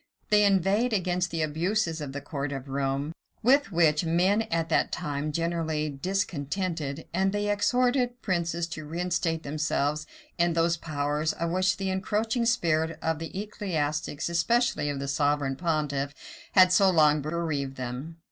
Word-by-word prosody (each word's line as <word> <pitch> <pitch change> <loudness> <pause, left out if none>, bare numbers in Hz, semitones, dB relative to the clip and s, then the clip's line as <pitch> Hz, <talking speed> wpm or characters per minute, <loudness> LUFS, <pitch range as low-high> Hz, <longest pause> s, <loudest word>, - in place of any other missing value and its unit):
They 210 0 +6
inveighed 200 +5 +2
against 180 -2 0
the 165 -1 -1
abuses 165 +2 0
of 145 -2 -5
the 145 +1 -5
court 140 -1 -4
of 135 -1 -5
Rome, 140 +2 -1 0.3
with 270 0 +4
which 160 -3 +3
men 180 +5 +2
were 225 - -2
at 165 0 0
that - - +2
time 145 +1 -3
generally 160 -1 -1
discontented; 160 -1 -2
and 190 +2 +2
they 205 0 -1
exhorted 245 +3 +1
princes 170 -2 0
to 155 -1 -6
reinstate 165 0 -1
themselves 150 0 -1 0.3
in 170 0 +3
those 165 +1 +2
powers, 150 -1 -1
of 170 0 -2
which 185 +1 +2
the 195 -1 -2
encroaching 220 +5 0
spirit 165 -7 +1
of 160 -1 0
the 165 +3 -5
ecclesiastics, 155 -8 -2
especially 170 -1 +1
of 145 - -2
the 140 0 -4
sovereign 145 -1 +1
pontiff, 150 -3 -1 0.4
had 185 -1 +7
so 195 0 +5
long 155 -4 +4
bereaved 150 -3 -2
them. 130 +6 -6
165 Hz, 155 wpm, -27 LUFS, 150-190 Hz, 0.4 s, had